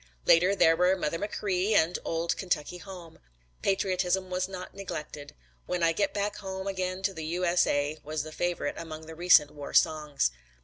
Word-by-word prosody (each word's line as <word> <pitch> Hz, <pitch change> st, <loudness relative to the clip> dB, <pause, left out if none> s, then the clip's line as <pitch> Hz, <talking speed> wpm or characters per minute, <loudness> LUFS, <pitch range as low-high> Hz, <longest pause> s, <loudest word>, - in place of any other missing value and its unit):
Later 180 Hz, +4 st, +5 dB
there 165 Hz, -3 st, +5 dB
were 180 Hz, +2 st, +3 dB
"Mother 165 Hz, -1 st, -2 dB
Machree" 205 Hz, 0 st, 0 dB
and 170 Hz, -1 st, +3 dB
"Old 165 Hz, +1 st, -1 dB
Kentucky 180 Hz, -2 st, -2 dB
Home." 180 Hz, -4 st, -11 dB, 0.4 s
Patriotism 190 Hz, -1 st, 0 dB
was 180 Hz, 0 st, 0 dB
not 185 Hz, -1 st, -7 dB
neglected. 150 Hz, -6 st, -7 dB, 0.3 s
"When 180 Hz, -1 st, -1 dB
I 165 Hz, -, +5 dB
Get 200 Hz, +4 st, 0 dB
Back 205 Hz, 0 st, -2 dB
Home 190 Hz, -1 st, -6 dB
Again 185 Hz, -1 st, -3 dB
to 195 Hz, -, +1 dB
the 160 Hz, -3 st, -6 dB
U.S.A." 165 Hz, -4 st, +1 dB
was 155 Hz, 0 st, -3 dB
the 155 Hz, -, -8 dB
favorite 175 Hz, +2 st, -2 dB
among 160 Hz, -1 st, -7 dB
the 160 Hz, -, -9 dB
recent 165 Hz, -3 st, +5 dB
war 145 Hz, -1 st, -8 dB
songs. 150 Hz, -, +2 dB
175 Hz, 170 wpm, -28 LUFS, 160-190 Hz, 0.4 s, Later